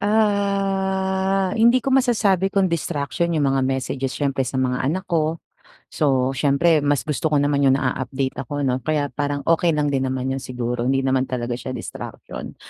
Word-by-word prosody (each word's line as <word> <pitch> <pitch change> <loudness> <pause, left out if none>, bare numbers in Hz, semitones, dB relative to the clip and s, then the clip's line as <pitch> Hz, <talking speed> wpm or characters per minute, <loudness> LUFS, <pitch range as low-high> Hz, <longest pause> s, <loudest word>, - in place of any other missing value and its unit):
Ah, 195 -2 +1
hindi 235 +3 +5
ko 260 - -3
masasabi 215 -8 +2
kung 195 -2 +2
distraction 170 0 -2
yung 150 -4 +2
mga 135 -1 +1
messages 130 0 -2
siyempre, 140 -2 -1
sa 130 +1 -2
mga 125 0 0
anak 185 +7 -2
ko. 165 -1 0 0.5
So, 135 -3 +1
siyempre 145 +4 +3
mas 145 -1 +1
gusto 150 +1 -1
ko 150 - 0
naman 145 0 +2
yung 135 - +5
na-a-update 130 0 -2
ako 145 +2 -3
'no, 130 -1 +1
kaya 145 0 -1
parang 145 -1 -2
okey 165 0 +2
lang 145 -1 0
din 135 -1 0
naman 130 0 -2
'yon 135 - -2
siguro, 125 -1 -3
hindi 135 0 +1
naman 130 0 +1
talaga 120 -1 -3
siya 130 +1 -5
distraction. - - -8
145 Hz, 175 wpm, -22 LUFS, 130-190 Hz, 0.5 s, hindi